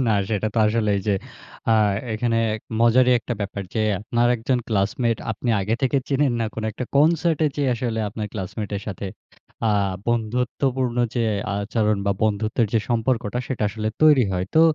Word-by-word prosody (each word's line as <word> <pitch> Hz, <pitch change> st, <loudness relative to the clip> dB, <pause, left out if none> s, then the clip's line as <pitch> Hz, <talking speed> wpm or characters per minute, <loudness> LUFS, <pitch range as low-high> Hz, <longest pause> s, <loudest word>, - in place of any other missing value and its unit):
না -, -, +2 dB, 0.2 s
সেটা 105 Hz, 0 st, 0 dB
তো -, -, +1 dB
আসলে 105 Hz, -1 st, +1 dB
এই -, -, -1 dB
যে, 105 Hz, -, +4 dB, 0.6 s
আ -, -, +5 dB, 0.4 s
এখানে 115 Hz, +1 st, 0 dB, 0.2 s
এক 110 Hz, -, -6 dB, 0.2 s
মজারই 125 Hz, +2 st, +5 dB
একটা 120 Hz, +1 st, -4 dB
ব্যাপার 100 Hz, 0 st, -3 dB
যে, 110 Hz, -, +1 dB, 0.2 s
আপনার 120 Hz, +3 st, +1 dB
একজন 125 Hz, +3 st, 0 dB
ক্লাসমেট 115 Hz, +3 st, +1 dB, 0.2 s
আপনি 120 Hz, +3 st, -5 dB
আগে 105 Hz, +4 st, 0 dB
থেকে 135 Hz, +1 st, +2 dB
চেনেন 140 Hz, -1 st, +2 dB
না -, -, +1 dB
কোন 110 Hz, -, -4 dB
একটা 125 Hz, -, -4 dB
কনসার্টে 160 Hz, +1 st, +3 dB
যেয়ে 140 Hz, -3 st, +1 dB
আসলে 115 Hz, -1 st, -2 dB
আপনার 105 Hz, +1 st, -5 dB
ক্লাসমেটের 100 Hz, +1 st, -4 dB
সাথে 100 Hz, -1 st, -5 dB, 0.6 s
আ -, -, +3 dB, 0.4 s
বন্ধুত্বপূর্ণ 125 Hz, +2 st, 0 dB, 0.2 s
যে, 120 Hz, -2 st, +1 dB, 0.3 s
আচরণ 105 Hz, +1 st, 0 dB
বা 100 Hz, -, +3 dB
বন্ধুত্বের 110 Hz, +2 st, +1 dB
যে, 115 Hz, -, +4 dB
সম্পর্কটা 120 Hz, -1 st, 0 dB
সেটা 130 Hz, -5 st, -3 dB
আসলে 110 Hz, +1 st, -3 dB
তৈরি 150 Hz, -6 st, +6 dB
হয়। 90 Hz, 0 st, -1 dB
তো 160 Hz, -, +6 dB
115 Hz, 170 wpm, -23 LUFS, 105-125 Hz, 0.6 s, তৈরি